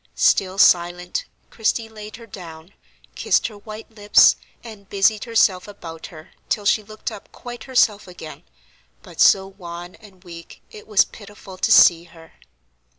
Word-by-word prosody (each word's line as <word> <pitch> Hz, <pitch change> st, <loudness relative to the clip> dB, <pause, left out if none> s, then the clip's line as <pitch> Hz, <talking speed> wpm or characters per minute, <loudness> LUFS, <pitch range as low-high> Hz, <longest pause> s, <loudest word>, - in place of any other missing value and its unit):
Still 190 Hz, 0 st, +2 dB
silent, 175 Hz, -1 st, +2 dB, 0.3 s
Christie 225 Hz, 0 st, -1 dB
laid 215 Hz, -1 st, -11 dB
her 230 Hz, 0 st, -12 dB
down, 170 Hz, -4 st, -12 dB, 0.4 s
kissed -, -, +1 dB
her 210 Hz, -, -13 dB
white 215 Hz, +2 st, -11 dB
lips, 210 Hz, -1 st, +5 dB, 0.3 s
and 215 Hz, -4 st, -12 dB
busied 205 Hz, +2 st, +1 dB
herself 210 Hz, -5 st, +2 dB
about 165 Hz, -5 st, -10 dB
her 155 Hz, -2 st, -14 dB, 0.2 s
till 210 Hz, -, -1 dB
she 215 Hz, -, +3 dB
looked 215 Hz, +1 st, -7 dB
up 200 Hz, -, -12 dB
quite 240 Hz, -1 st, -10 dB
herself 225 Hz, -7 st, +1 dB
again, 175 Hz, -4 st, -11 dB, 0.6 s
but -, -, -6 dB
so 190 Hz, -1 st, +5 dB
wan 175 Hz, -2 st, -10 dB
and 195 Hz, -4 st, -18 dB
weak, 170 Hz, -2 st, -12 dB
it 210 Hz, -, -13 dB
was 210 Hz, -3 st, +4 dB
pitiful 205 Hz, -2 st, -13 dB
to -, -, 0 dB
see 170 Hz, -1 st, +6 dB
her. 165 Hz, -1 st, -17 dB
195 Hz, 150 wpm, -21 LUFS, 175-215 Hz, 0.6 s, see